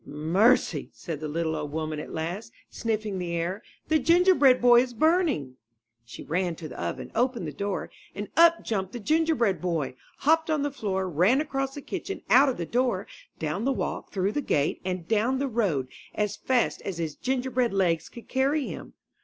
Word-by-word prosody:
''Mercy!'' 175 - +2
said 165 -5 -6
the 155 - -4
little 160 +1 -1
old 150 -2 -4
woman 155 0 -3
at - - -7
last, 180 +8 -4 0.2
sniffing 215 -4 -2
the 175 -1 -3
air, 175 +4 -2 0.3
''the 315 0 +3
Gingerbread 335 -6 +5
Boy 240 0 +7
is 245 -1 -4
burning." 300 - +1 0.5
She 115 - -10
ran 175 +1 -1
to 160 -1 -8
the 135 - -8
oven, 85 -1 -4
opened 240 -4 0
the 155 - -4
door, 200 -1 -3 0.2
and 205 +1 -4
up 335 0 +6
jumped 190 -4 -2
the 240 - -5
Gingerbread 305 - +1
Boy, 165 -7 -1 0.2
hopped 320 +2 +2
on 305 -2 +1
the 290 - -1
floor, 190 -7 -2
ran 185 - +3
across 270 -3 -2
the 285 - -7
kitchen, 395 - -5
out 270 +3 +7
of 255 - -2
the 170 - -3
door, 240 -3 0 0.3
down 160 +7 -2
the 270 - +2
walk, 265 - -3
through 195 +1 0
the 290 - -1
gate 145 - 0
and 180 -2 -3
down 225 +4 +2
the 275 +1 -1
road 195 - 0 0.3
as 210 -1 -1
fast 255 -2 0
as 190 -4 -5
his 160 -3 -3
gingerbread 255 - -1
legs 175 -4 +1
could 235 - -12
carry 275 +2 +1
him! - - -8
210 Hz, 190 wpm, -27 LUFS, 170-265 Hz, 0.5 s, Boy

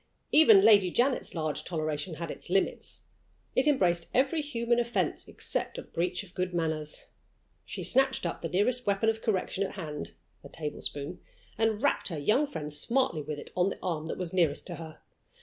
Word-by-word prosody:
Even 390 +6 +7
Lady 200 -4 +6
Janet's 250 +4 +1
large 155 -2 -2
toleration 155 0 -3
had 165 0 -5
its - - -8
limits. 195 +2 0 0.5
It 265 - +3
embraced 175 - +2
every 275 +5 +2
human 235 -5 0
offense 235 0 -1
except - - -1
a - - -5
breach 180 +3 -2
of 180 - -16
good 180 -1 -2
manners. 160 -2 -2 0.6
She - - -6
snatched 265 -5 +2
up 170 - -3
the 165 - -3
nearest 235 +7 +1
weapon 200 +2 +2
of 225 0 -1
correction 200 -2 -1
at 195 - -4
hand 155 -6 -6 0.3
a - - -11
tablespoon 145 -2 -5 0.4
and 225 +1 0
rapped 285 - +2
her 165 - -3
young 215 - +2
friend 150 - -3
smartly 230 - +3
with 150 0 -5
it - - -10
on 180 +1 +2
the - - -6
arm 160 -4 -2
that - - -4
was 180 -2 -4
nearest 165 -6 +1
to 175 - -6
her. 160 -1 -10
185 Hz, 185 wpm, -29 LUFS, 160-235 Hz, 0.6 s, Even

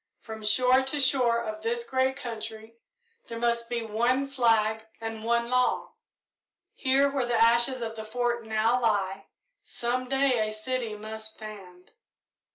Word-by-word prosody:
From 220 -1 -8
shore 250 +4 +4
to 265 +2 -1
shore 250 -4 +3
of 215 -1 -5
this 235 +1 -1
great 260 +1 0
country 220 -1 -7 0.5
there 230 - -6
must 235 0 0
be 240 -1 -2
one 240 +5 +1
flag 225 -5 +2 0.2
and 225 -1 -6
one 235 +1 +1
law. 250 0 +1 0.8
Here, 270 +1 +3
where 270 -3 -1
the 240 - 0
ashes 235 +2 +4
of 225 0 -5
the 220 - -6
Fort 240 +1 -1
now 220 +3 +2
lie, 195 -4 0 0.3
some 250 +1 -2
day 270 -2 +2
a - - -4
city 225 0 -3
must 220 +1 -8
stand." 190 -5 -11
235 Hz, 150 wpm, -27 LUFS, 220-250 Hz, 0.8 s, shore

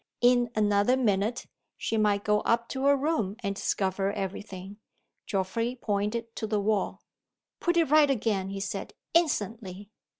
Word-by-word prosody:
In 245 0 +4
another 210 +3 +3
minute, 215 -1 0 0.3
she - - -2
might 205 -2 +2
go 210 -1 +3
up 235 +2 +1
to 265 0 -2
her 280 0 +5
room, 275 -9 0
and 200 -1 -1
discover 195 0 0
every 195 -1 -3
thing. 195 -1 -9 0.5
Geoffrey 230 +6 -1
pointed 215 +2 -2
to 220 - -2
the 210 -1 0
wall. 205 0 -1 0.6
"Put 345 0 +1
it 325 -4 +2
right 305 -2 +6
again," 210 -7 0
he 195 0 -5
said. - - -5 0.2
"Instantly!" 215 - 0
210 Hz, 155 wpm, -28 LUFS, 200-245 Hz, 0.6 s, right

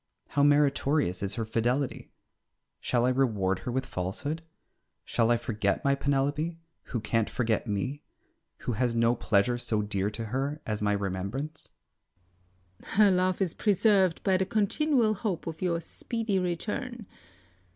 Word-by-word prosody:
How 145 - +1
meritorious 145 - +3
is 100 -1 -2
her 115 -2 -2
fidelity! 120 +5 -1 0.7
Shall 120 -1 +1
I - - +3
reward 105 -8 +1
her 120 - -4
with 130 +2 -1
falsehood? 135 - -3 0.6
Shall 115 -1 +1
I 120 - +4
forget 110 -3 -1
my 140 - +4
Penelope, 145 +4 0 0.3
who 120 - -3
can't 115 0 0
forget 115 -1 0
me, 110 +8 -2 0.6
who - - -2
has 120 +1 0
no 115 +1 +4
pleasure 120 +1 +1
so 110 -3 -1
dear 100 -1 -1
to 115 +2 -5
her 135 +6 -2
as 105 -1 -2
my 105 0 +2
remembrance? 100 +10 -3 1.1
Circe. - - -14
Her 205 -1 +6
love 185 +1 +1
is 175 - -2
preserved 200 -4 +3
by 190 -2 +3
the 190 - +1
continual 225 +3 +2
hope 200 -4 -3
of 160 -1 -6
your 170 -2 +1
speedy 220 +3 -2
return. 215 +7 -3
135 Hz, 150 wpm, -28 LUFS, 110-175 Hz, 1.1 s, Her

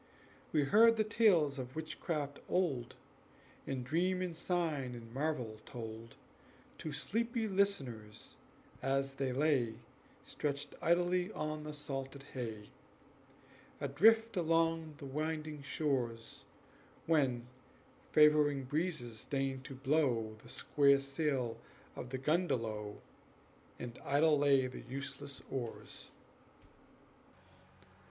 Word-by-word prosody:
We 150 -2 +3
heard 225 +10 +6
the 220 - +3
tales 180 - +3
of 130 0 -6
witchcraft 155 -2 -3
old, 150 -10 0 0.7
And 130 -2 -3
dream 180 +6 +1
and 175 -2 -3
sign 160 -8 -1
and 115 -1 -10
marvel 130 -6 -1
told 115 -2 -8 0.6
To 155 - -4
sleepy 230 - -1
listeners 135 - -1 0.5
as 135 0 0
they 135 -1 -1
lay 130 -4 +2 0.5
Stretched 145 -1 -3
idly 175 +2 +2
on 155 0 -3
the 150 - -4
salted 135 -1 -5
hay, 110 -5 -5 1.1
Adrift 220 - +4
along 165 -2 +1
the 145 - -8
winding 155 +1 -3
shores, 130 -6 -2 0.6
When 135 -7 +2 0.7
favoring 150 -2 +5
breezes 140 -6 -2
deigned 135 -1 -1
to 135 - -7
blow 130 -5 +1
The 120 - -14
square 140 +1 +4
sail 135 -4 -1 0.4
of 125 - -6
the 130 - -3
gundelow 115 - 0 0.8
And 120 0 -7
idle 145 +2 +4
lay 140 -2 +5
the 130 - -6
useless 140 +1 -6
oars. 120 -4 -5
140 Hz, 105 wpm, -35 LUFS, 130-160 Hz, 1.1 s, heard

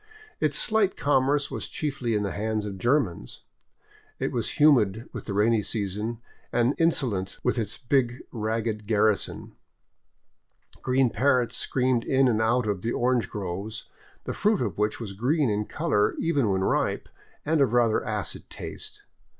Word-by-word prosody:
Its - - +1
slight 215 -3 +1
commerce 145 0 +2
was - - -4
chiefly 135 -6 -2
in 105 - +1
the 100 - -2
hands 110 0 -2
of 100 -2 -6
Germans. 115 - 0 0.8
It - - -2
was - - -2
humid 120 -8 +4
with - - -6
the 100 - -4
rainy 110 +2 +3
season, 105 +2 -2 0.3
and 120 +3 +2
insolent 120 - 0
with 125 -1 +1
its 105 -2 -2
big 125 -2 0
ragged 110 -1 -2
garrison. 105 -1 +1 1.3
Green 130 -1 +2
parrots 130 -2 +2
screamed 125 -2 +1
in 135 0 +3
and 110 -3 +2
out 115 +2 +2
of 100 -3 -1
the 115 - -1
orange 120 -4 +1
groves, 100 +2 -5 0.3
the - - -4
fruit 210 -1 +2
of - - -4
which 105 0 0
was 105 -5 -6
green 130 - +1
in 105 +1 -1
color 105 -10 0
even 145 -9 +1
when 95 -1 +1
ripe - - 0 0.4
and 155 0 +2
of 130 -5 +3
rather 120 -3 +3
acid - - -4
taste. - - -8
115 Hz, 155 wpm, -26 LUFS, 105-130 Hz, 1.3 s, humid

